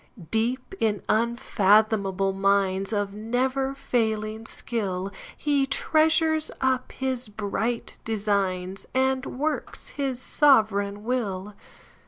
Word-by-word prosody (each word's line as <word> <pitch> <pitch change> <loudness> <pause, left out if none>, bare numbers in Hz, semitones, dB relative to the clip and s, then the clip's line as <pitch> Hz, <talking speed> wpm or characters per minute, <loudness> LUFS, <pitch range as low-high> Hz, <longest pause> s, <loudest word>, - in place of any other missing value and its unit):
Deep 245 +8 -1
in 210 -3 0
unfathomable 210 -3 +2
minesOf 195 +1 +1
never 255 +6 -1
failing 220 -3 -1
skill, 195 -4 -2 0.3
He 285 -2 +1
treasures 315 +2 +2
up 260 -1 0
his 260 -3 -2
bright 220 +3 -3
designs, 195 -3 -1
And 260 0 +2
works 300 +2 -2
his 270 -3 -3
sovereign 215 -8 +3
will. 210 -5 -2
220 Hz, 90 wpm, -26 LUFS, 200-260 Hz, 0.3 s, sovereign